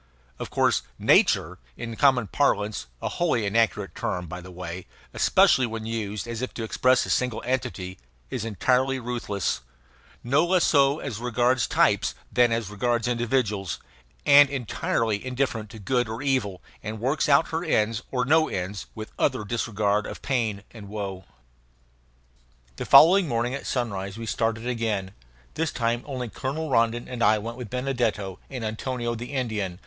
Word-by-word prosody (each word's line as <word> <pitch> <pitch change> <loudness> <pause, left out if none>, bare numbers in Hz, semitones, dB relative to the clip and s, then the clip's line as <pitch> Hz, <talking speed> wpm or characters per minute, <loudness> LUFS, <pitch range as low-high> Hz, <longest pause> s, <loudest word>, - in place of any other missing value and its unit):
Of - - -5
course - - +2 0.2
"nature" 90 +3 +3 0.2
in 115 -1 -5
common 130 -2 +4
parlance 105 - 0 0.2
a - - 0
wholly 155 -11 0
inaccurate 105 -3 +1
term, 90 0 -3
by 90 +2 -7
the 90 - -11
way, 90 0 -7 0.3
especially 130 -2 +4
when 110 -1 -5
used 110 -1 -3
as 115 0 -4
if 130 - -4
to 115 - -4
express 125 +3 +2
a - - -7
single 125 -3 0
entity 120 -8 -3 0.3
is - - -3
entirely 130 +4 +1
ruthless, 115 - -2 0.6
no 140 +6 +3
less 180 0 +3
so 140 -1 +4
as 125 -9 -5
regards 125 +1 +1
types - - +2 0.2
than 120 -1 +4
as 115 -3 -1
regards 120 +3 0
individuals, 115 - 0 0.5
and 145 -1 +8
entirely 115 -4 -1
indifferent 125 -4 -2
to 110 - -10
good 120 +3 0
or 115 +4 -5
evil, 115 -10 -1 0.2
and 110 +1 -5
works 135 +7 0
out 140 +3 +4
her 165 +1 -2
ends 115 -8 +1
or 125 -1 0
no 155 +3 +4
ends 95 +2 -4
with 110 0 -7
utter - - +1
disregard 105 -2 0
of - - -8
pain 115 -7 -1
and 105 -4 -11
woe. 100 -3 -5 1.5
The - - -4
following 180 +2 +7
morning 120 0 -1
at 140 - -5
sunrise 100 -5 -2
we 115 - -6
started 115 +1 -1
again. 110 -6 -2 0.4
This 160 -1 -1
time 120 -1 0
only 130 -3 -4
Colonel 140 +6 -4
Rondon 115 0 +2
and 125 -2 -6
I 110 - +5
went 115 +3 -5
with 125 -4 -7
Benedetto 120 -7 -2
and 125 -4 -5
Antonio 120 +2 -3
the 120 +4 -7
Indian. 110 -9 -2
115 Hz, 160 wpm, -25 LUFS, 105-130 Hz, 1.5 s, and